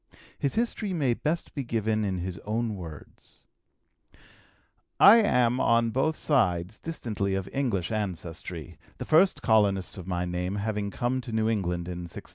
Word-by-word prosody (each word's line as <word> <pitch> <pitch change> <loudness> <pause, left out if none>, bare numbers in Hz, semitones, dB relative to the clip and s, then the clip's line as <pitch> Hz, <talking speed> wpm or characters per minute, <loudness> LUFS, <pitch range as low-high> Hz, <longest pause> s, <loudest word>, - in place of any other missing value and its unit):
His 140 - -1
history 225 -3 -1
may 140 -8 +1
best 155 +7 -2
be 140 - -3
given 110 -2 0
in 95 -2 -1
his 90 0 -5
own 110 +3 -2
words: 85 -6 -11 1.6
"I 210 +4 +9
am 125 - +3
on 115 0 +3
both 135 +6 +1
sides 100 - +1
distantly 105 -11 -3
of 95 -1 -3
English 115 -11 -1
ancestry, 85 -5 -5 0.2
the - - -5
first 175 +5 +4
colonists 100 -4 +2
of 90 - -9
my 90 -1 -1
name 90 +2 -2
having 105 0 -2
come 125 +5 -1
to 120 -1 -8
New 110 0 +1
England 90 -6 -1
in 90 -1 -5
1630. - - -9
110 Hz, 155 wpm, -27 LUFS, 90-125 Hz, 1.6 s, I